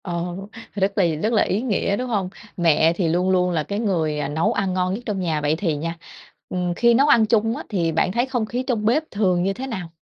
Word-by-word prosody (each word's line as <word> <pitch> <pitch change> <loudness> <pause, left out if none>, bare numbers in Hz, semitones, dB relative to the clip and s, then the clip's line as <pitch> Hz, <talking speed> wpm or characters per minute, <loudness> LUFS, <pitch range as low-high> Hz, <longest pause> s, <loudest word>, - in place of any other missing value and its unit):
Ờ, 175 -1 -3 0.4
r - - -3
rất 195 +1 0
là 200 - +4 0.2
rất 220 +2 +1
là 215 - +4
ý 200 +4 -1
nghĩa, 205 -4 0
đúng 255 - -3
hông? 200 -5 -1 0.3
Mẹ 165 -1 +4
thì 170 -1 -1
luôn 175 +3 +1
luôn 180 -1 +2
là 160 -3 0
cái 200 +6 -4
người, 165 -9 0
à, - - -1
nấu 160 +10 0
ăn 195 -4 -1
ngon 185 0 0
nhất 230 +5 -5
trong 205 -4 -2
nhà. 160 -4 -1
Vậy 150 +1 +1
thì 165 -4 -1
nha, 165 +3 -4 0.5
ừm, 180 -1 -1
khi 235 +6 +4
nấu 275 +5 +4
ăn 230 -6 +5
chung 225 +1 +1
á - - -6
thì 170 -6 0
bạn 165 +3 +1
thấy 240 +5 +1
không 250 -4 -1
khí 245 +4 -3
trong 225 -5 -1
bếp 260 +8 +3
thường 185 -4 +1
như 195 +1 0
thế 260 +5 -6
nào? 190 -9 -5
190 Hz, 265 wpm, -22 LUFS, 170-225 Hz, 0.5 s, ăn